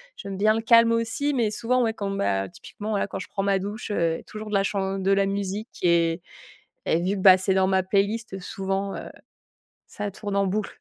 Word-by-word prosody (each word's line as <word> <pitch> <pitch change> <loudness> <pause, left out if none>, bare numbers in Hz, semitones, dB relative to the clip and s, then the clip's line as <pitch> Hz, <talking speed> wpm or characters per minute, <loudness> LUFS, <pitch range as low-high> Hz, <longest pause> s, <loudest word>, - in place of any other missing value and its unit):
j'aime 195 -1 -7
bien 215 +2 +4
le 225 - -1
calme 230 0 +6
aussi, 230 +6 0
mais 235 -5 +1
souvent 240 +4 0
ouais, 225 -2 +1
quand 200 -1 -3
mmh, 195 - -3
bah 95 -1 0
typiquement, 210 - -9
voila, 200 -1 0
quand - - -6
je - - -7
prends 195 - -2
ma 195 0 +2
douche, 205 +4 -5
heu, 165 -5 0
toujours 215 0 -7
de - - -6
la 195 - +4
chan 195 -1 -1
de 190 +1 +1
la 195 0 +3
musique 200 +2 -4
et 170 -1 +2 0.7
et 165 - +2
vu 195 +3 0
que - - -4
bah, 185 -1 +8
c'est 190 +1 0
dans 190 0 +3
ma 190 0 +2
playlist, 200 +3 0
heu, - - -4
souvent, 195 +1 -3
heu, - - -7 0.8
ça 205 0 -5
tourne 205 0 -5
en 200 0 +2
boucle. 205 +2 -2
200 Hz, 235 wpm, -25 LUFS, 190-215 Hz, 0.8 s, bah